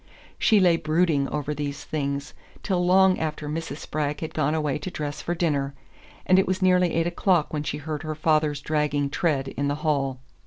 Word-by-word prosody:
She 215 - +5
lay 175 -3 +4
brooding 155 -3 +1
over 150 0 -2
these 145 0 -4
things 140 -2 -3 0.3
till 180 -3 0
long 190 +1 +4
after 155 -1 -3
Mrs. 155 -1 -4
Spragg 150 -1 -3
had 160 0 -5
gone 150 0 +1
away 150 -2 -1
to 150 - -5
dress 150 -3 -5
for 175 - -2
dinner, 140 -5 0 0.5
and 185 +1 +5
it 190 - +2
was 185 0 0
nearly 180 -3 +3
eight 165 0 +2
o'clock 175 -2 +1
when 150 - -1
she 150 0 -3
heard 150 0 -5
her 155 0 -4
father's 155 -2 +1
dragging 145 -2 0
tread 140 -5 0
in 140 +1 -2
the 145 - 0
hall. 135 -4 0
155 Hz, 195 wpm, -25 LUFS, 145-170 Hz, 0.5 s, She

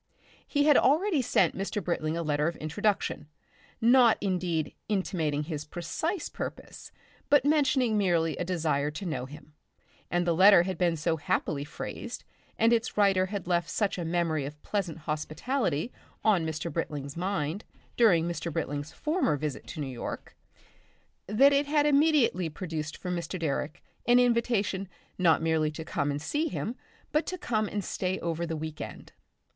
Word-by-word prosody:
He 285 -1 +2
had 295 -2 +6
already 320 +2 +3
sent 245 - +2
Mr. 200 +1 -3
Britling 160 -1 -1
a 170 - -2
letter 150 0 +1
of 170 - -2
introduction, 195 0 -1 0.5
not 240 0 +6
indeed 180 -5 -1 0.2
intimating 165 -7 0
his 150 -1 -4
precise 175 - -3
purpose, - - -7 0.4
but 285 -2 +5
mentioning 265 -7 +3
merely 170 -5 +2
a - - -1
desire 155 -5 0
to 160 +6 -6
know 155 -7 -3
him, 150 +1 -13 0.6
and 175 0 +1
the 170 - +2
letter 185 +1 +7
had 190 +1 -4
been 170 -2 +2
so 160 +2 0
happily 145 -1 -1
phrased 145 - -7 0.3
and 230 +1 +4
its 225 -2 0
writer 195 -2 +4
had 200 -1 -4
left 175 -1 0
such 200 0 0
a - - -2
memory 165 -3 0
of 145 +2 -7
pleasant 190 -6 -2
hospitality 155 - -2 0.3
on 190 -7 +3
Mr. 160 0 -4
Britling's 145 -3 -4
mind 175 0 -2 0.3
during 175 -8 +4
Mr. 170 0 -3
Britling's 145 -2 -3
former 305 - 0
visit 150 -1 -4
to - - -7
New 145 - -2
York, 130 -3 -6 0.9
that 270 +8 +5
it 280 +1 +2
had 295 0 +3
immediately 285 - +3
produced 160 -1 -5
for 180 - -5
Mr. 175 +1 -3
Direck 155 0 -2 0.2
an 245 0 +6
invitation 230 -6 +1 0.3
not 165 -3 +4
merely 160 -1 +2
to 155 +1 -7
come 145 -2 -1
and 145 0 -1
see 295 - -1
him 235 -5 -3 0.4
but 305 +2 +1
to 365 - -3
come 215 -9 -1
and 205 0 -3
stay 185 0 -2
over 170 0 -2
the 160 -1 -3
week 155 0 -6
end. - - -8
175 Hz, 165 wpm, -28 LUFS, 155-220 Hz, 0.9 s, letter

